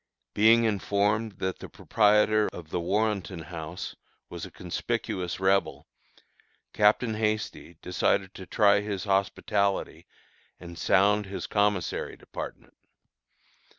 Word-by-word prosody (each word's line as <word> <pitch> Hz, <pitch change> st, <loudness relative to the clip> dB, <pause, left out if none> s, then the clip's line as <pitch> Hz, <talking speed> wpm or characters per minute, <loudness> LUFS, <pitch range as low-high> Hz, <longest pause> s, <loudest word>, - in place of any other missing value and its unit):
Being 115 Hz, +2 st, +5 dB
informed 105 Hz, +1 st, 0 dB
that 95 Hz, 0 st, -4 dB
the -, -, -9 dB
proprietor 105 Hz, 0 st, +3 dB
of 85 Hz, -2 st, -10 dB
the -, -, -1 dB
Warrenton 95 Hz, -2 st, -1 dB
House 85 Hz, +1 st, -7 dB, 0.3 s
was -, -, -7 dB
a -, -, -13 dB
conspicuous 90 Hz, -1 st, -3 dB
Rebel, 95 Hz, -7 st, +1 dB, 0.9 s
Captain 110 Hz, +2 st, +3 dB
Hasty 105 Hz, -5 st, -2 dB
decided 95 Hz, +1 st, 0 dB
to 95 Hz, -, -10 dB
try 100 Hz, -1 st, +4 dB
his 105 Hz, -2 st, -4 dB
hospitality 100 Hz, 0 st, 0 dB, 0.5 s
and 85 Hz, -1 st, -10 dB
sound 100 Hz, +4 st, +3 dB
his 100 Hz, -, -5 dB
commissary 100 Hz, -4 st, 0 dB
department. -, -, -9 dB
100 Hz, 110 wpm, -27 LUFS, 90-105 Hz, 0.9 s, Being